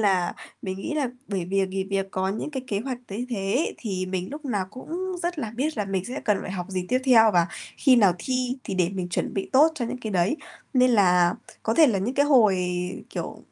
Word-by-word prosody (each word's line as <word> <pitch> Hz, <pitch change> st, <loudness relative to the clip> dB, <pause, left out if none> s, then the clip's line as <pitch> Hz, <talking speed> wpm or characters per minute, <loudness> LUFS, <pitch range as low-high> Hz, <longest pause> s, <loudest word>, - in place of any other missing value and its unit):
là 190 Hz, -4 st, +2 dB, 0.3 s
mình 190 Hz, -1 st, -3 dB
nghĩ 300 Hz, +10 st, -4 dB
là 285 Hz, -5 st, 0 dB, 0.2 s
bởi 190 Hz, -4 st, -2 dB
vì 195 Hz, +1 st, +1 dB
nghỉ 190 Hz, 0 st, -3 dB
việc 195 Hz, 0 st, -2 dB
có 190 Hz, 0 st, -1 dB
những 215 Hz, +9 st, -3 dB
cái 265 Hz, -3 st, -4 dB
kế 200 Hz, -4 st, -1 dB
hoạch 255 Hz, 0 st, -4 dB
thấy 225 Hz, +6 st, -4 dB
thế, 210 Hz, +7 st, 0 dB
thì 185 Hz, -5 st, -3 dB
mình 185 Hz, -1 st, -3 dB
lúc 295 Hz, +1 st, -8 dB
nào 205 Hz, -8 st, -1 dB
cũng 355 Hz, -, -5 dB
rất 345 Hz, -2 st, -2 dB
là 225 Hz, -6 st, -3 dB
biết 295 Hz, +2 st, -1 dB
là 210 Hz, -, +1 dB
mình 195 Hz, -1 st, -2 dB
sẽ 255 Hz, +4 st, -5 dB
cần 210 Hz, -3 st, +2 dB
phải -, -, -6 dB
học 180 Hz, -2 st, -4 dB
gì 185 Hz, -1 st, -2 dB
tiếp 255 Hz, -, +3 dB
theo 225 Hz, -4 st, +7 dB
và 170 Hz, -2 st, +4 dB, 0.3 s
khi 260 Hz, -3 st, +5 dB
nào 200 Hz, -5 st, +6 dB
thi, 255 Hz, 0 st, -1 dB
thì 190 Hz, -, -3 dB
để 180 Hz, -2 st, +2 dB
mình 185 Hz, -2 st, -4 dB
chuẩn -, -, -2 dB
bị 195 Hz, -, -2 dB
tốt 305 Hz, +5 st, +6 dB
cho 255 Hz, -, -2 dB
những 245 Hz, +2 st, -4 dB
cái 220 Hz, -2 st, -4 dB
đấy. 185 Hz, -, +2 dB, 0.4 s
Nên 255 Hz, -1 st, +5 dB
là 180 Hz, -5 st, +4 dB, 0.3 s
có 225 Hz, -, 0 dB
thể 315 Hz, +2 st, +7 dB
là 210 Hz, -6 st, +2 dB
những 230 Hz, +8 st, -2 dB
cái 285 Hz, +1 st, +3 dB
hồi, 225 Hz, -9 st, +5 dB, 0.5 s
kiểu, -, -, -5 dB
210 Hz, 245 wpm, -25 LUFS, 190-255 Hz, 0.5 s, theo